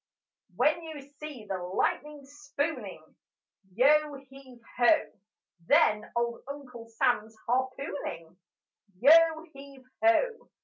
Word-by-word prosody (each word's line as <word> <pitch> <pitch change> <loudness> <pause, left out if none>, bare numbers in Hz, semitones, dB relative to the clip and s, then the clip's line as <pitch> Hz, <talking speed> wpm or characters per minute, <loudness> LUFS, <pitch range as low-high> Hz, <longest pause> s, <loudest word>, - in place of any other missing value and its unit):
When 310 +3 +2
you 320 -2 -8 0.2
see 290 -8 -8
the 190 -2 -3
lightning 280 +11 -2
spooning, 290 +2 -5 0.6
Yo 295 +4 +4
heave 270 -2 -15 0.2
ho! 305 +6 +4 0.6
Then 210 0 +3
old 235 0 -1
Uncle 255 -5 -9
Sam's 225 -1 -1
harpooning: 245 - -3 0.6
Yo 320 +4 +6
heave 275 -1 -13 0.2
ho! 455 +8 +2
275 Hz, 95 wpm, -28 LUFS, 235-300 Hz, 0.6 s, Yo